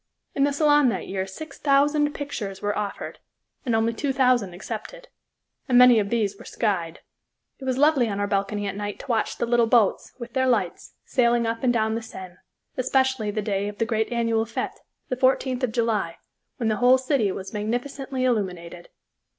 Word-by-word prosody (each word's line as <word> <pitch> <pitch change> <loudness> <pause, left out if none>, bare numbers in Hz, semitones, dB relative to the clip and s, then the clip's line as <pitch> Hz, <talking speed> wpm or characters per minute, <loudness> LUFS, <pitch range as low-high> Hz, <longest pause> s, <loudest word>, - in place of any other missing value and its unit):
In 275 - +2
the 285 - +1
Salon 290 -2 +4
that - - -3
year 190 0 -3
six 310 +12 -9
thousand 295 +1 +3
pictures 215 -10 -5
were 205 0 -1
offered, 205 -1 -5 0.5
and 235 - +2
only 225 +1 +1
two 275 +4 -1
thousand 250 -7 +2
accepted, 230 - -7 0.6
and 245 - +5
many 250 -2 +8
of 200 -1 -1
these 205 -4 -1
were - - -11
"skyed." 175 -7 -2 0.6
It 265 - -8
was 260 -1 0
lovely 285 -4 +4
on 200 -1 -3
our 205 - +1
balcony 200 +1 -1
at 195 -1 -3
night 205 0 -4
to - - -13
watch 225 -4 0
the - - 0
little 235 -1 +3
boats, 225 -4 +2
with 235 -2 -9
their 260 0 +1
lights, 250 - -1
sailing 235 -2 +2
up 230 0 -2
and 250 - +4
down 220 -2 +1
the 230 - -2
Seine, 185 -5 -10 0.4
especially 260 -3 +1
the 210 +1 -2
day 200 -1 -1
of 205 0 -6
the 225 - 0
great 220 +1 -1
annual 230 -1 +1
fête, 230 - -4 0.3
the 255 - 0
14th 260 0 +1
of 255 -3 0
July, 220 -7 -1 0.4
when 230 - -1
the 215 - 0
whole 250 +1 +5
city 260 -6 +1
was 190 +2 -7
magnificently 255 +5 -3
illuminated. 180 -8 -2
230 Hz, 190 wpm, -24 LUFS, 205-260 Hz, 0.6 s, many